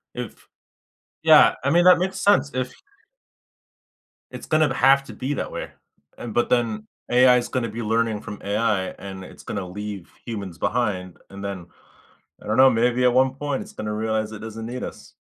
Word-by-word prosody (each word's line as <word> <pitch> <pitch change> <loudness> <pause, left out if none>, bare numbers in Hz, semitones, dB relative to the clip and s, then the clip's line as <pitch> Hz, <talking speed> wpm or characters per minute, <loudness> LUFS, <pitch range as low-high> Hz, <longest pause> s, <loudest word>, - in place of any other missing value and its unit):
If - - -8 0.8
Yeah, - - +7
I 140 - +2
mean, 175 +2 +4
that 180 0 +7
makes 190 +2 -2
sense, 200 -8 +3
if 130 0 -2 1.6
It's - - -8
gonna 155 -1 +2
b 135 - -3
have 135 +1 +5
to - - -10
be 135 +3 -3
that - - -4
way. - - -6 0.5
And 120 -2 -7
but 120 - +1
then 110 -3 0 0.2
AI 125 0 +6
is 120 - -2
gonna 120 -2 -2
be 115 +3 -6
learning 110 -1 0
from 105 -2 -9
AI 100 -2 0
and 95 -1 -8
it's - - -13
gonna 95 -3 -4
leave 100 -1 -7
humans 100 -7 -6
behind. 95 -6 -2
And 100 +1 -9
then, 95 -3 -5 0.7
I - - -12
don't 110 - 0
know, 130 0 +8
maybe 120 +1 +1
at 125 -1 +4
one 130 +1 +3
point 145 -1 -3
it's - - -11
gonna 105 0 -4
realize 110 0 -1
it 110 - -8
doesn't 110 0 -7
need 125 +2 -5
us. - - -9
115 Hz, 190 wpm, -23 LUFS, 105-130 Hz, 1.6 s, know